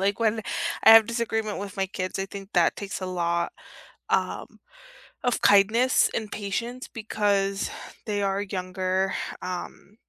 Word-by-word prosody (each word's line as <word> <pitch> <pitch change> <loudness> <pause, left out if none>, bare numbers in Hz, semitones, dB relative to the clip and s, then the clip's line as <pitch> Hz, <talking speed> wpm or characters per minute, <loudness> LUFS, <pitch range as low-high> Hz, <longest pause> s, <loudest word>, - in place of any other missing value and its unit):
like, 195 +2 0
when 220 -1 +2 0.4
I - - +10
have 225 -1 +9
disagreement 225 -2 -2
with 200 0 -7
my 190 - +1
kids, 185 0 -4
I 195 - -2
think 195 0 -9
that 175 -2 +3
takes 195 -2 -5
a 185 - -3
lot, 170 -1 -1 0.6
um, - - -1 0.7
of 245 - +1
kindness 215 +6 +5
and 215 -2 -3
patience 235 +5 -4
because 200 -2 0 0.4
they 205 -1 -1
are 195 0 0
younger, 185 0 -1 0.3
um, 185 +3 -7
200 Hz, 145 wpm, -26 LUFS, 190-220 Hz, 0.7 s, I